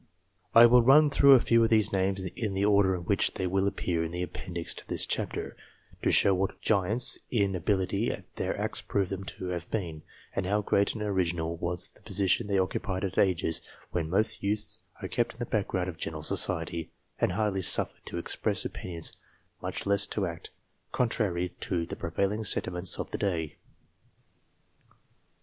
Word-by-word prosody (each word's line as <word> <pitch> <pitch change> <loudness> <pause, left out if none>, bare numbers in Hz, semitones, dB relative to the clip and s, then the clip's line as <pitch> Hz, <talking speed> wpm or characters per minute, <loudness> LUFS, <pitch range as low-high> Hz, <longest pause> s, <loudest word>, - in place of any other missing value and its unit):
I 115 +1 +10
will 120 +1 +6
run 145 +5 +6
through 140 0 +7
a - - +6
few 115 0 +3
of 115 - +2
these 110 -2 +3
names 95 0 0
in 105 -5 -3
the 100 +1 +1
order 100 -2 +4
in 90 - -5
which 85 - +1
they 95 - -2
will 95 +2 +1
appear 85 -4 -1
in 80 - -3
the 90 +1 -3
appendix 90 -1 -4
to - - -7
this - - +2
chapter, - - -3 0.5
to - - +1
show 100 - +5
what 95 +1 -2
giants 105 +4 +3
in 100 -5 +1
ability 95 +4 0 0.3
their - - -2
acts - - -1
prove 100 -2 -1
them 95 0 -4
to 95 -1 -6
have 85 -1 -4
been, 85 -8 -4 0.3
and 95 -2 -1
how 105 +2 +1
great 100 0 +2
and 105 - -4
original 85 -5 -1
was 85 +1 0
the - - -23
position 100 0 0
they 100 -1 +1
occupied 95 0 -1
at 95 -2 -1
ages 85 -4 +2 0.3
when 80 -3 -2
most 100 +5 +1
youths 105 +1 -1 0.2
are - - -2
kept 120 0 -1
in - - -21
the 120 - -3
back 105 -3 -1
ground 90 -1 -2
of 90 -3 -6
general 75 -2 -5
society, 80 +1 0 0.3
and 90 - +1
hardly 100 -1 0
suffered - - +2
to - - -5
express - - -1
opinions, 85 -3 -5 0.5
much - - -4
less 100 0 +3
to 100 - -2
act, 85 -1 -7 0.4
contrary 100 -7 0
to 85 -3 -2
the - - -6
prevailing 100 +6 -2
sentiments 90 -3 0
of - - -5
the - - -4
day. 80 -6 -2
95 Hz, 185 wpm, -28 LUFS, 90-105 Hz, 0.5 s, I